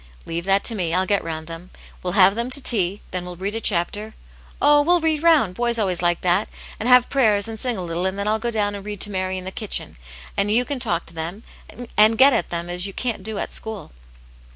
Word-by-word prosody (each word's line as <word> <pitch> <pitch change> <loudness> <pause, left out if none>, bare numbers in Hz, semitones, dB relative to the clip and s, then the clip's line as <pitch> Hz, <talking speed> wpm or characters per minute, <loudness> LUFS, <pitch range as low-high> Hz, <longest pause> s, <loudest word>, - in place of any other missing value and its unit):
'* - - -25
" - - -21
Leave 170 +1 -4
that 195 +1 +2
to 235 - 0
me. 175 -5 -1
I'll 185 +1 +1
get 200 +1 +1
round 160 -1 -5
them. 165 +2 -9 0.3
We'll 180 -1 -3
have 195 -1 +6
them 235 +3 -3
to 260 - +3
tea; 200 -7 +3
then 180 -1 -3
we'll 180 0 -8
read 195 +4 -4
a 225 - -3
chapter; 205 +3 -1 0.4
oh, 290 0 +5
we'll 350 +4 +3
read 315 -2 0
round, 315 - +3
boys 235 +3 -1
always 185 -6 -1
like 175 -1 +1
that, 180 +3 +1 0.3
and 230 - -1
have 250 -1 +6
prayers, 220 -6 +2
and 225 -1 -6
sing 245 -4 -2
a 185 - -4
little, 175 +2 -2
and 190 +1 -4
then 200 +1 -2
I'll 215 +1 +1
go 240 +2 -2
down 210 -3 -1
and 200 -1 -6
read 205 -1 -6
to 210 - +1
Mary 185 -1 -2
in 185 - -6
the 190 - -5
kitchen, 210 - -3 0.4
and 200 +1 0
you 235 +4 +2
can 285 -1 -4
talk 170 -7 -1
to 165 - -15
them, 170 +7 -6 0.5
and 215 +1 +5
get 270 +3 +7
at - - -1
them 170 0 -4
as 180 +2 -1
you 195 - -8
can't 240 -2 -3
do 215 +2 -5
at - - -4
school.' 220 -3 -5
200 Hz, 260 wpm, -21 LUFS, 180-230 Hz, 0.5 s, get